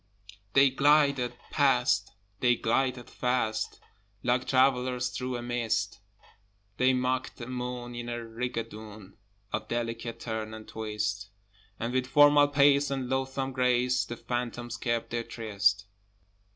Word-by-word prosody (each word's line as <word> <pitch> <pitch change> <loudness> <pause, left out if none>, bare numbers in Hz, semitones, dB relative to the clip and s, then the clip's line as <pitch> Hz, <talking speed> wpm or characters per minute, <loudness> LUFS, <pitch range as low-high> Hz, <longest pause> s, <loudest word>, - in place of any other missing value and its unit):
They 135 -1 +6
glided 140 -3 +3 0.2
past, 135 -6 +2 0.3
they 120 +2 +4
glided 125 +2 0
fast, 125 -3 -1 0.4
Like 125 +1 +1
travellers 125 -1 +2
through 125 0 -3
a 120 - -6
mist: 115 -4 -1 0.8
They 130 +1 +4
mocked 130 0 -1
the 120 - -6
moon 125 -1 -5
in 120 0 -5
a 120 - -3
rigadoon 110 -3 -6 0.4
Of 110 0 -2
delicate 115 0 -3
turn 110 -1 -4
and 110 0 -11
twist, 105 -2 -3 0.5
And 120 +2 -2
with 130 0 0
formal 145 +1 +6
pace 145 0 +4
and 135 -2 -3
loathsome 135 0 -1
grace 125 -1 +2
The 120 - -7
phantoms 120 0 -4
kept 120 -1 -2
their 120 0 -1
tryst. 100 -4 0
125 Hz, 125 wpm, -29 LUFS, 115-130 Hz, 0.8 s, They